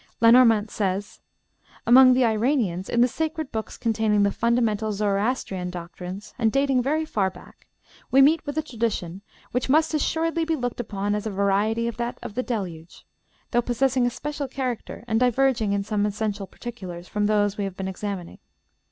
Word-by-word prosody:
Lenormant 230 -2 +5
says: 200 0 -2 0.7
"Among 255 +2 +7
the 255 -1 +3
Iranians, 220 -5 0
in 235 - +2
the 245 - +6
sacred 315 +2 -3
books 220 -1 -5
containing 220 -2 +1
the 200 - +2
fundamental 225 -2 +1
Zoroastrian 200 -2 -1
doctrines, 180 +3 -8
and 225 -2 +2
dating 275 -1 +2
very 305 +5 0
far 200 -10 0
back, - - -17 0.4
we 270 - +4
meet 295 +4 +5
with 290 +1 -5
a 315 - +1
tradition 220 - -3 0.3
which 250 +1 -1
must 315 +3 +3
assuredly 325 +2 0
be 325 0 0
looked 245 -4 -4
upon 205 -3 -2
as 210 +1 -2
a - - -1
variety 205 +3 +1
of 235 - -4
that 240 0 -3
of 240 -4 -6
the 250 - -1
Deluge, 180 -9 -5 0.5
though 240 - +3
possessing 250 +1 +1
a - - +2
special 290 +3 -5
character, 255 -5 -4
and 225 -1 +1
diverging 250 -3 +2
in 200 0 0
some 210 0 -1
essential 205 -1 -3
particulars 185 -8 -8
from 210 0 0
those 205 -1 +1
we 200 - 0
have 195 -1 -6
been 190 - -3
examining. 190 -2 -5
225 Hz, 175 wpm, -24 LUFS, 200-255 Hz, 0.7 s, Among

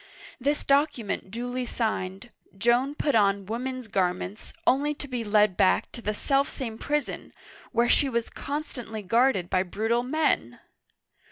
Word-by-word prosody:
This 285 +3 0
document 275 -9 +1
duly 245 +4 -3
signed, 220 -2 -3 0.3
Joan 240 +6 +2
put 295 -1 0
on 200 -2 +3
women's 250 +3 -4
garments, 185 +1 -2
only 290 +3 +3
to 285 - -7
be 250 -3 -3
led 210 -2 +3
back 185 - +3
to 235 - -8
the 210 -1 -2
self 275 +4 +1
same 230 -5 -6
prison, 295 0 -2 0.4
where 235 0 +3
she 275 +3 +4
was 235 -2 -2
constantly 245 -7 -5
guarded 230 -2 +3
by 185 +1 +2
brutal 220 +6 0
men 305 +5 0
235 Hz, 145 wpm, -27 LUFS, 210-270 Hz, 0.4 s, she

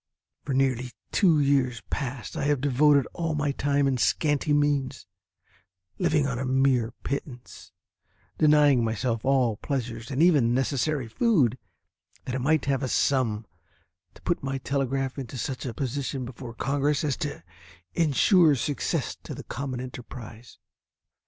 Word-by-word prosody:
For 140 - -2
nearly 130 -2 0 0.2
two 170 -7 +4
years 135 -4 +1
past 130 -4 -4
I - - -2
have 145 -2 +2
devoted 140 +1 +4
all 165 -2 -2
my 150 -1 0
time 140 0 +1
and 135 -2 +1
scanty 145 - +1
means, 145 -3 +1 0.9
living 155 -5 +2
on 125 -3 -2
a - - -2
mere 130 -3 +2
pittance, 130 -3 -6 0.7
denying 150 -5 +5
myself 115 0 -1
all 130 -5 +2
pleasures 120 -4 -4
and 140 +4 +1
even 140 -9 +4
necessary 135 0 0
food, 130 - +2 0.7
that 125 - -4
I 130 - -1
might 150 +3 +1
have 140 -1 0
a 130 - -1
sum, 120 -5 +1 0.7
to - - -18
put - - 0
my 135 0 -2
telegraph 135 0 -2
into 130 0 -6
such 130 +2 -4
a 120 - -4
position 135 0 -3
before 120 -1 -9
Congress 140 +4 0
as 145 -4 0
to 145 - -5 0.5
insure 165 - +4
success 140 +3 -2
to - - -7
the - - -8
common 130 0 -5
enterprise. 125 -2 -9
135 Hz, 145 wpm, -26 LUFS, 125-145 Hz, 0.9 s, denying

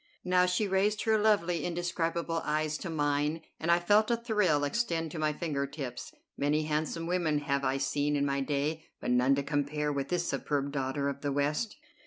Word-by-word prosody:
Now 180 0 +3
she 180 +4 +1
raised 200 +2 +1
her 220 -1 +3
lovely, 180 -7 +2
indescribable 170 -1 -1
eyes 155 0 0
to 185 - -5
mine, 150 0 0 0.2
and 165 +2 +1
I 170 - +6
felt 205 +5 +3
a 235 - +2
thrill 210 -11 +1
extend 165 -1 -1
to 160 - -5
my 155 0 +2
finger 145 -3 -2
tips. 135 -4 -6 0.2
Many 150 +2 +1
handsome 155 +2 -2
women 170 -3 +1
have 140 -1 -1
I 135 0 +1
seen 145 +2 0
in 140 0 +1
my 140 0 0
day, 150 +3 -1 0.2
but - - -2
none 125 +2 +4
to 140 - -1
compare 145 +1 -1
with 140 -1 -2
this 175 -1 -1
superb 140 -2 -1
daughter 140 0 -1
of 140 0 -3
the 145 - -1
West. 150 +10 0
155 Hz, 195 wpm, -30 LUFS, 145-175 Hz, 0.2 s, I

